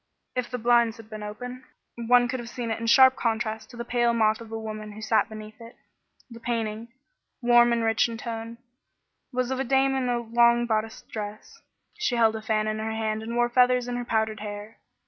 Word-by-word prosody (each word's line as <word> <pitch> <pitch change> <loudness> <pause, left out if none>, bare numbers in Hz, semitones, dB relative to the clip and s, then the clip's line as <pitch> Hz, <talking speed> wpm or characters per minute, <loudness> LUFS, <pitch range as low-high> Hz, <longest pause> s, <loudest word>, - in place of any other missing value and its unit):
If 250 -1 -2
the 250 - -3
blinds 235 -1 +3
had 225 -1 -14
been 215 0 -7
open, 245 +5 -7 0.3
one 245 +1 +3
could 255 +1 -3
have 235 0 -7
seen 240 -2 -4
it 225 - -2
in 230 - -4
sharp 260 +2 +7
contrast 220 -1 -2
to 240 - -12
the 235 - -5
pale 240 -1 +1
moth 220 0 +2
of 225 -1 -11
a 225 - -3
woman 215 -1 -6
who 215 - -10
sat 220 +1 +2
beneath 215 +1 -10
it. 230 +1 -12 0.5
The 230 -2 -11
painting, 230 -1 -3 0.5
warm 240 -1 +5
and 235 -1 +1
rich 225 +1 +2
in 230 - -5
tone, 230 0 -6 0.7
was 255 0 -1
of 260 - -1
a - - +1
dame 270 +1 +2
in 260 -2 0
a 240 - +1
long 235 +1 +3
bodiced 220 -1 -2
dress. 215 - -7 0.4
She 345 -13 0
held 225 -2 +3
a 220 - -5
fan 215 0 0
in 215 0 -2
her 220 0 -3
hand 220 -1 -2
and 230 +2 -5
wore 240 0 +3
feathers 250 0 +3
in 245 - -3
her 245 - -3
powdered 220 -2 -1
hair. 210 +1 -8
230 Hz, 220 wpm, -26 LUFS, 220-240 Hz, 0.7 s, sharp